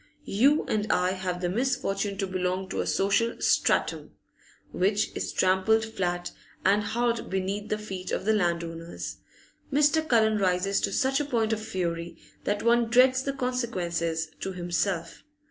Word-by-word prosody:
You 275 +9 +4
and 215 0 0
I 180 0 +2
have 185 -1 -3
the 175 - 0
misfortune 205 -3 -1
to 195 - -1
belong 185 0 -2
to - - -1
a - - -3
social 200 +4 +1
'strattum' - - +1 0.6
which 205 +3 +1
is - - -3
trampled 190 +4 +2
flat 175 -5 -3 0.3
and 200 +2 +4
hard 235 +2 -1
beneath 195 +3 -2
the 215 - 0
feet 190 -3 -6
of - - -2
the 220 - +3
landowners. 170 -3 -2 0.5
Mr. 295 +2 +3
Cullen 220 -2 +4
rises 190 +1 +1
to - - 0
such 270 0 +1
a 295 - -1
point 230 -5 0
of 215 - -2
fury 170 -4 -3 0.3
that 205 0 -1
one 235 0 +3
dreads 255 +2 +5
the 275 +1 -2
consequences 175 -11 -2
to 190 - -4
himself. 175 -1 -2
200 Hz, 155 wpm, -27 LUFS, 180-230 Hz, 0.6 s, dreads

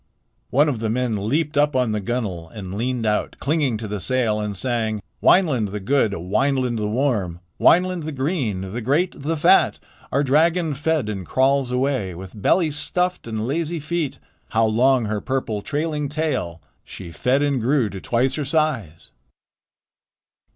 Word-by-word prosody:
One 145 +4 +4
of 130 -6 -1
the 110 -1 -1
men 110 -3 -1
leaped 150 +2 0
upon 130 -5 +2
the 105 - -1
gunwale 95 -7 -3
and 95 -2 -8
leaned 120 +2 -2
out, 105 -1 0
clinging 145 -5 0
to 110 0 -6
the 105 0 -4
sail, 115 -1 +1
and 105 -2 -3
sang: 110 0 -1 0.2
"Wineland 140 - +4
the 105 - -4
good, 110 0 +1
Wineland 125 +7 0
the 105 -1 -1
warm, 105 -8 0 0.2
Wineland 180 -1 +3
the 155 - -3
green, 130 - -2
the 120 - -3
great, 145 +10 +1
the 160 +3 -1
fat. - - +4 0.3
Our 140 +2 +2
dragon 160 +4 +2
fed 150 -2 0
and 100 -3 -4
crawls 130 +5 +1
away 125 -8 -1
With 95 +3 -10
belly 165 - +3
stuffed 180 +2 -1
and 110 -1 -3
lazy 165 +5 -2
feet. 155 -1 -2 0.3
How 115 0 +2
long 120 +3 +3
her 105 -1 -2
purple, 130 -6 -2
trailing 150 +2 -2
tail! 135 - -2 0.2
She 85 -3 -9
fed 125 - +1
and 140 -4 +1
grew 130 0 +2
to 95 - -7
twice 125 +3 +1
her 150 - -2
size." 135 - -1
125 Hz, 165 wpm, -22 LUFS, 105-145 Hz, 0.3 s, One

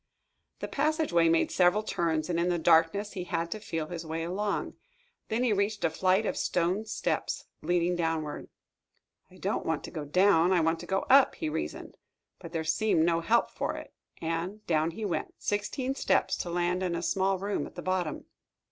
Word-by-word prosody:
The - - -2
passageway 295 - +2
made 165 0 +2
several 180 +4 +3
turns, 165 -6 -1
and 170 -1 0
in 175 +1 +1
the 175 - +1
darkness 165 +5 +3
he 180 -2 -5
had 170 -2 -2
to 215 - -3
feel 165 -6 -3
his 170 +1 -6
way 165 0 -3
along. 200 +4 -2 0.6
Then 225 +3 0
he 240 -4 +3
reached 205 +1 0
a 165 - +2
flight 185 +5 +2
of - - -1
stone 180 +5 0
steps, 220 - -2 0.2
leading 175 0 +1
downward. 160 -3 -2 0.8
"I - - -17
don't - - -2
want - - -1
to - - -8
go 155 - -5
down 180 +3 +4
I 180 - +4
want 165 0 +1
to 175 - -9
go 190 +1 +1
up," 270 0 +6
he 320 - -3
reasoned. - - -5 0.4
But 170 -2 -9
there 165 -2 -2
seemed 160 +1 +2
no 170 -1 +2
help 225 +8 +2
for - - -3
it, - - -9 0.3
and 170 +6 -3
down 160 -1 +2
he 210 +6 -5
went, 185 - -3
sixteen 250 +6 -2
steps, - - +1
to 175 - -4
land 175 +1 0
in 180 -2 -1
a 170 - -3
small 190 +2 +1
room 200 +2 -2
at - - -16
the - - -7
bottom. 185 -4 -2
175 Hz, 195 wpm, -29 LUFS, 165-205 Hz, 0.8 s, up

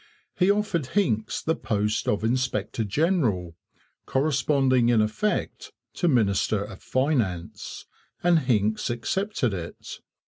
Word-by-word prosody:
He 180 +1 +2
offered 200 -8 +1
Hincks 120 - 0
the 160 - +1
post 105 0 -1
of 105 +1 0
inspector 115 -2 -1
general, 110 - 0 0.5
corresponding 135 -3 +2
in 120 -2 +4
effect 110 - -1 0.2
to 175 - 0
minister 105 - +2
of 100 -2 -10
Finance, 120 - -2 0.4
and 175 -1 +5
Hincks 110 -6 0
accepted 125 - -1
it. 85 -3 -7
120 Hz, 110 wpm, -25 LUFS, 105-155 Hz, 0.5 s, and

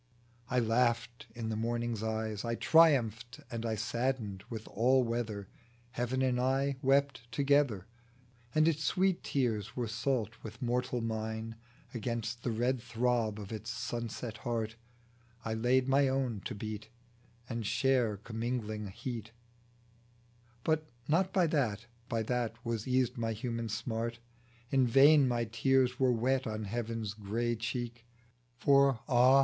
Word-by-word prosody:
I 125 - 0
laughed 120 +1 +1
in 115 -2 -3
the 110 - -1
morning's 115 0 -1
eyes. 110 -1 -2
I 115 -1 -1
triumphed 125 -7 +4
and 115 -1 -3
I 110 - 0
saddened 110 -3 -2
with 110 -2 -6
all 130 +3 +3
weather, 115 -4 -3 0.4
Heaven 125 +3 -1
and 125 -1 +2
I 135 +2 +1
wept 135 -3 +1
together, 140 -6 +2 0.7
And 155 +1 +5
its 155 -1 +1
sweet 185 +1 +2
tears 115 -4 -1
were 120 -2 -1
salt 115 -1 -1
with 110 0 -9
mortal 125 0 -1
mine; 110 0 -3 0.4
Against 115 0 -3
the 125 - -2
red 120 +2 0
throb 120 -2 0
of 100 0 -8
its 110 +1 -5
sunset 115 -1 -4
heart 115 -3 -2 0.7
I 110 - -1
laid 125 +3 +2
my 135 +1 +4
own 130 -6 -1
to - - -3
beat, 105 0 -6 0.6
And 115 -2 -3
share 120 -1 +2
commingling 110 -1 -3
heat; 115 +3 -6 1.3
But 155 -1 0 0.2
not 185 +5 +2
by 185 -3 +3
that, 120 -9 0 0.2
by 115 -2 0
that, 120 0 -1
was 115 -1 -2
eased 125 -1 +1
my 115 -1 0
human 115 +1 -3
smart. 115 +2 -2 0.5
In 135 -2 +4
vain 140 +3 +7
my 120 -1 0
tears 125 +2 +2
were 130 -1 +4
wet 125 +2 +1
on 110 0 -3
Heaven's 115 0 -3
grey 110 +3 -1
cheek. 120 +1 -4 0.5
For 140 -1 +4
ah 130 0 +6
120 Hz, 140 wpm, -32 LUFS, 110-130 Hz, 1.3 s, vain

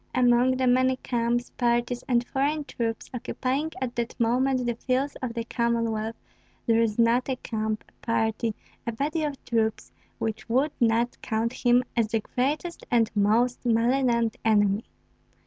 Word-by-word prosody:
Among 250 +1 +4
the 260 - +1
many 255 +1 +4
camps, 240 -1 -1
parties, 240 0 0
and 245 -1 +2
foreign 290 +4 0
troops 230 -4 -3
occupying 265 +5 -2
at 250 -2 -3
that 235 +1 -3
moment 250 +2 +2
the 240 - +1
fields 260 +4 -1
of 245 -3 -3
the 230 - -2
Commonwealth, 230 -2 -1 0.5
there 230 0 +3
is 220 -2 0
not 235 +3 +3
a 260 - +1
camp, 220 -3 -3
a - - -26
party, 225 -1 0 0.3
a 235 - -1
body 295 +7 -1
of 290 -3 -4
troops 225 -2 -1 0.3
which 220 0 -4
would 265 +6 +2
not 235 0 +1
count 230 +1 -1
him 245 0 +3
as 230 -2 +2
the 225 +1 0
greatest 295 +10 -2
and 230 -2 +3
most 225 +5 +2
malignant 235 0 +2
enemy. 205 -1 +3
240 Hz, 155 wpm, -26 LUFS, 225-255 Hz, 0.5 s, Among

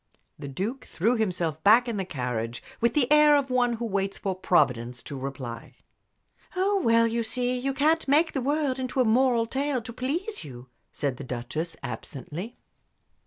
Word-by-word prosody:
The 140 - -6
Duke 205 - -4
threw 225 +8 +1
himself 175 -8 -1
back 230 +5 +6
in 230 -3 -2
the 190 - -2
carriage 125 -6 -3 0.2
with 235 0 +1
the 290 -4 +4
air 300 0 +7
of 275 -2 -1
one 245 -1 +2
who 235 +1 -3
waits 195 -2 -1
for 195 - -2
Providence 125 -10 +1
to 145 - -7
reply. 130 -3 -6 0.8
"Oh, 390 +1 +2
well, 230 0 +5
you 230 +1 0
see, 245 +2 -1
you 260 +2 -1
can't 305 +4 +2
make 305 +4 +3
the 270 - -1
world 280 0 0
into 260 +1 -2
a 255 - +5
moral 235 0 +3
tale 270 +3 -1
to 235 - -8
please 335 - -3
you," 125 -3 -11 0.2
said 140 -3 -2
the 140 - -7
Duchess, 130 +7 -4
absently. 165 - -6
230 Hz, 175 wpm, -27 LUFS, -, 0.8 s, air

